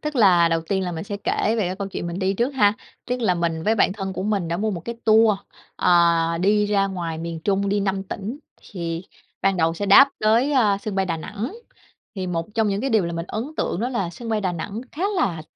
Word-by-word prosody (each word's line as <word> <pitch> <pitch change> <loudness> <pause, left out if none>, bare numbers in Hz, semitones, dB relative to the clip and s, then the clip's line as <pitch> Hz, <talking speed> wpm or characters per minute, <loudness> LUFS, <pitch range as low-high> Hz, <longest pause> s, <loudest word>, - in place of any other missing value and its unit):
tức 300 -2 -4
là 180 -7 +5
đầu 165 0 +1
tiên 190 -1 0
là 180 -1 -3
mình 160 +1 -5
sẽ 205 0 -4
kể - - +1 0.2
về 210 -5 0
cái 185 +1 -3
câu 200 0 -4
chuyện 180 - -5
mình 170 +1 -4
đi 190 0 0
trước 235 +5 +1
ha, 205 -5 +4 0.3
tức 250 0 -2
là 200 -6 +2
mình 165 -2 -1
với 220 +6 +2
bạn 205 - +3
thân 195 -1 -4
của 185 - -4
mình 200 -4 -1
đã 170 - -1
mua 215 +4 -1
một 180 -4 -4
cái 235 +7 -6
tour, 220 -2 +5 0.4
ờ, 180 - +3 0.5
đi 205 +2 +3
ra 200 -1 +2
ngoài 170 -4 -4
miền 165 0 -5
Trung, 200 +2 0
đi 205 +1 +1
5 195 -1 -1
tỉnh. 200 +6 -6 0.3
Thì 170 -3 -4 0.4
ban 195 -1 +2
đầu 165 -1 +1
sẽ 205 +4 -3
đáp 235 +8 +8
tới, 230 +7 +3
a, 215 -7 +3
sân 205 0 -5
bay 190 -1 +1
Đà 165 -2 -1
Nẵng, 210 - -5 0.6
thì 185 -2 -3
một 165 -2 -2
trong 220 -1 +2
những 200 0 -1
cái 270 - -1
điều 220 -6 +3
làm 170 0 -4
mình 165 0 -3
ấn 220 - -3
tượng - - -1
đó 240 +3 -1
là 200 -9 -2
sân 230 +7 -8
bay 220 -1 0
Đà 185 -2 0
Nẵng 195 +6 -5
khá 330 - -4
là, 170 - 0
195 Hz, 260 wpm, -23 LUFS, 175-215 Hz, 0.6 s, đáp